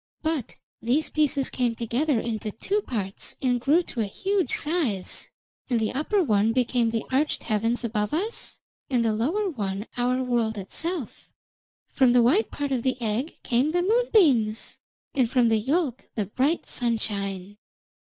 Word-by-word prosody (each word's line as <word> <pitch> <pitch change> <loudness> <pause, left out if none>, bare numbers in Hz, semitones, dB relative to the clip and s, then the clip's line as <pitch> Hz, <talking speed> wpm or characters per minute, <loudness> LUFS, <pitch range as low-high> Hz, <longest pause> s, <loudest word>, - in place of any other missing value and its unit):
But 315 -6 -2 0.3
these 260 +7 +1
pieces 295 -3 +1
came 245 -2 0
together 240 +4 0
into 220 -2 -3
two 400 - -1
parts 200 - -4
and 245 -3 +1
grew 310 +7 +3
to 240 - -4
a - - +1
huge 390 - -1
size, 290 - 0 0.4
and 240 -3 +2
the 220 -1 -1
upper 360 +9 +1
one 215 -4 +2
became 245 -1 +2
the 225 -1 -2
arched 285 +4 +1
heavens 225 +2 0
above 210 -3 -1
us, 405 +9 -3 0.3
and 245 -3 +2
the 220 - +2
lower 320 - 0
one 205 - -3
our 250 +1 +1
world 235 -3 0
itself. 310 - -4 0.6
From 255 -3 +4
the 245 -1 +5
white 335 - +3
part 285 -1 -3
of 255 -3 +1
the 255 +1 -1
egg 235 +6 -2
came 255 +6 +1
the 355 0 +2
moonbeams, 355 - +2 0.3
and 255 -4 +2
from 245 -2 +3
the 225 -1 +3
yolk 270 +2 -1
the 210 - 0
bright 270 - 0
sunshine. 205 -4 -2
245 Hz, 160 wpm, -25 LUFS, 220-300 Hz, 0.6 s, the